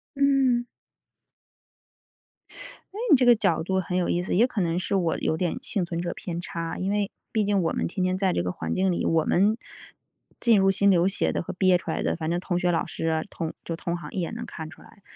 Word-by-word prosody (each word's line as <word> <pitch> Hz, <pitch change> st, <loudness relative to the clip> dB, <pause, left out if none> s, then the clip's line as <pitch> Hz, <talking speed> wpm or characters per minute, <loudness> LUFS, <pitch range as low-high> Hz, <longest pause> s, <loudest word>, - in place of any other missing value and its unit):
嗯。 275 Hz, -3 st, +3 dB, 2.3 s
哎， -, -, -10 dB
你 300 Hz, -, +9 dB
这 250 Hz, -1 st, +2 dB
个 240 Hz, -, +8 dB
角 165 Hz, -7 st, +1 dB
度 190 Hz, +2 st, 0 dB
很 180 Hz, 0 st, -2 dB
有 180 Hz, -, 0 dB
意 175 Hz, -, +1 dB
思， 180 Hz, -, -2 dB
也 225 Hz, +6 st, +5 dB
可 235 Hz, -5 st, -3 dB
能 170 Hz, 0 st, 0 dB
是 185 Hz, -, -2 dB
我 175 Hz, -4 st, +1 dB
有 160 Hz, -, 0 dB
点 180 Hz, +6 st, -1 dB
幸 210 Hz, -8 st, 0 dB
存 170 Hz, -1 st, -4 dB
者 175 Hz, 0 st, -3 dB
偏 170 Hz, -2 st, -5 dB
差。 165 Hz, -2 st, -4 dB
因 190 Hz, +1 st, -1 dB
为 205 Hz, -1 st, 0 dB, 0.2 s
毕 215 Hz, -2 st, +1 dB
竟 200 Hz, -1 st, +2 dB
我 165 Hz, -, 0 dB
们 -, -, -1 dB
天 185 Hz, +2 st, -3 dB
天 185 Hz, 0 st, +1 dB
在 190 Hz, -1 st, +1 dB
这 -, -, 0 dB
个 90 Hz, -, -2 dB
环 80 Hz, -2 st, -3 dB
境 190 Hz, 0 st, +2 dB
里， 175 Hz, -, -1 dB
我 160 Hz, -1 st, +2 dB
们 210 Hz, +5 st, +2 dB, 0.8 s
进 230 Hz, -3 st, +5 dB
入 195 Hz, 0 st, +4 dB
心 200 Hz, +1 st, +3 dB
流 175 Hz, -2 st, +4 dB
写 195 Hz, -, +1 dB
的 -, -, -2 dB
和 -, -, -6 dB
憋 185 Hz, 0 st, +3 dB
出 175 Hz, -, -4 dB
来 -, -, -2 dB
的， -, -, 0 dB
反 160 Hz, -1 st, -3 dB
正 175 Hz, +1 st, 0 dB
同 175 Hz, -1 st, -1 dB
学 180 Hz, 0 st, +1 dB
老 165 Hz, -, 0 dB
师 -, -, -4 dB
啊， 160 Hz, -1 st, +1 dB
同 165 Hz, -4 st, -4 dB
就 165 Hz, -, -4 dB
同 170 Hz, +1 st, -3 dB
行 170 Hz, -, -8 dB
一 190 Hz, -, -2 dB
眼 170 Hz, -, -4 dB
能 235 Hz, +1 st, -6 dB
看 160 Hz, -1 st, -7 dB
出 -, -, -15 dB
来。 200 Hz, -, -18 dB
185 Hz, 265 characters per minute, -26 LUFS, 170-205 Hz, 2.3 s, 你